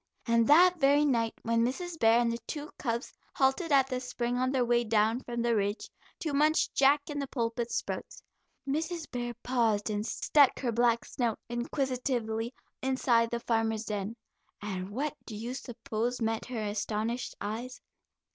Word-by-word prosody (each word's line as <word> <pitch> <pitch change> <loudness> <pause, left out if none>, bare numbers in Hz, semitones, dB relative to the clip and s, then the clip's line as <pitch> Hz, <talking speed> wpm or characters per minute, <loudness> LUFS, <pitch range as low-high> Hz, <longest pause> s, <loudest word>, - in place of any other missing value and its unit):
And 230 -1 +3
that 355 +4 +6
very 285 +1 +5
night 230 -5 +1
when 230 0 +2
Mrs. 330 +7 -3
Bear 225 0 +5
and 235 -1 +2
the 235 - -3
two 300 0 -5
cubs 235 -2 -2 0.2
halted 275 +5 +2
at 275 -2 +6
the 255 -1 -3
spring 245 -1 -2
on 255 +1 +1
their 260 -2 +2
way 240 0 +3
down 220 +1 +2
from 240 -2 -4
the 235 -1 +2
Ridge, 205 +1 -1 0.3
to 310 -3 -2
munch 305 +2 +3
jack 280 +1 +4
in 290 -1 -4
the 280 - -3
pulpit 235 -2 -2
sprouts, - - -4 0.4
Mrs. 320 +3 -2
Bear 240 -1 -3
paused 225 -4 +1
and 205 0 -1
stuck 275 +4 +3
her 250 -3 0
black 235 0 +2
snout 235 -4 -1
inquisitively 240 -2 -2 0.3
inside 250 -3 +2
the 235 - -2
farmer's 225 -1 0
den, 210 +1 -3 0.4
and 190 -2 -4
what 285 +8 -2
do 220 - -6
you 230 +4 -4
suppose 240 -1 -3
met 225 -1 -1
her 240 -4 -3
astonished 215 +3 -2
eyes? 235 +5 -5
240 Hz, 165 wpm, -30 LUFS, 225-270 Hz, 0.4 s, that